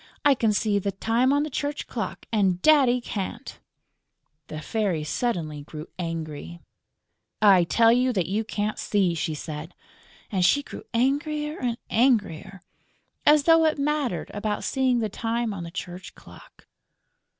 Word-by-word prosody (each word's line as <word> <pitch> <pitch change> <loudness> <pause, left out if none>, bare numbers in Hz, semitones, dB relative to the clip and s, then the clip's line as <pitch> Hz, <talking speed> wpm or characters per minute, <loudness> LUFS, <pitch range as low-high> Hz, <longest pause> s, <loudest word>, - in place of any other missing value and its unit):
I 285 - +7
can 225 -4 +1
see 205 -1 +1
the 200 +1 -2
time 230 +6 +1
on 285 +1 +2
the 305 - -3
church 285 +2 -3
clock; - - -5
and 195 -5 +2
Daddy 270 -5 +5
can't!" 200 -5 -6 0.9
The 155 - -6
Fairy 185 -1 -1
suddenly 155 -5 -2
grew 150 +2 -9
angry: 165 -1 -5 0.8
"I 195 -5 +6
tell 230 +6 +4
you 250 +2 +3
that 185 -6 0
you 205 +6 -1
can't 210 -1 -3
see!" 195 -4 +1
she 160 -1 -2
said. 155 +2 -7 0.6
And 190 -3 +1
she 285 +11 +4
grew - - -10
angrier 295 +5 0
and 240 -2 -1
angrier. 205 -7 +1 0.6
As 295 -1 +6
though 325 +1 +5
it 310 - +2
mattered 290 -3 -1
about 210 0 -2
seeing 260 -3 +1
the 220 - 0
time 230 +1 -2
on 185 -4 -6
the 170 - -7
church 180 +1 -8
clock! - - -16
215 Hz, 150 wpm, -25 LUFS, 180-260 Hz, 0.9 s, I